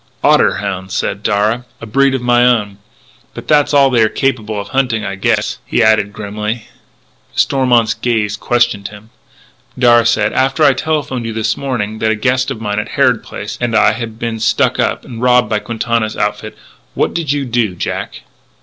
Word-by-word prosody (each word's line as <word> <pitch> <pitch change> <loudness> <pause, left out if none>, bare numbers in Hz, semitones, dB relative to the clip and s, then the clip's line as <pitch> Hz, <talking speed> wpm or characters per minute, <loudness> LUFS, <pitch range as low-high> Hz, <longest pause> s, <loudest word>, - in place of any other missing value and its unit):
"Otter - - +4
hounds," 95 -1 -4
said 100 - -2
Darragh, 105 +4 0
" - - -38
a - - -8
breed 135 +4 +2
of 125 - -4
my 120 0 +3
own.... 105 -5 +1 0.6
But - - -9
that's 150 -2 +3
all 140 -2 +4
they 120 -2 +3
are 110 - +4
capable 110 -6 -1
of 100 - -7
hunting, 125 -5 0
I - - -3
guess," 95 - -1
he 120 - +1
added 110 -2 +3
grimly. 105 +2 -5 0.7
Stormont's 125 -5 +2
gaze 110 -4 -1
questioned 120 -3 0
him. 105 +2 -14 0.7
Darragh 120 -2 +5
said: 115 - +1
"After 135 +4 +1
I 140 -2 +6
telephoned 135 -4 -2
you 115 - -4
this 110 0 -1
morning 110 -6 -3
that 110 - +1
a 110 - +1
guest 125 +3 0
of - - -5
mine 105 -1 -2
at 105 - -5
Harrod - - +3
Place, 105 +1 -7
and 120 -2 0
I, 110 - +5
had 110 0 -6
been 115 -1 -4
stuck 110 - +1
up - - -1
and 115 -1 -8
robbed 125 -1 +3
by 105 - +1
Quintana's 110 0 -2
outfit, 105 +1 -3 0.4
what - - 0
did 165 -4 -1
you 145 -1 -1
do, 115 -6 -1
Jack?" - - -5
115 Hz, 190 wpm, -15 LUFS, 105-125 Hz, 0.7 s, I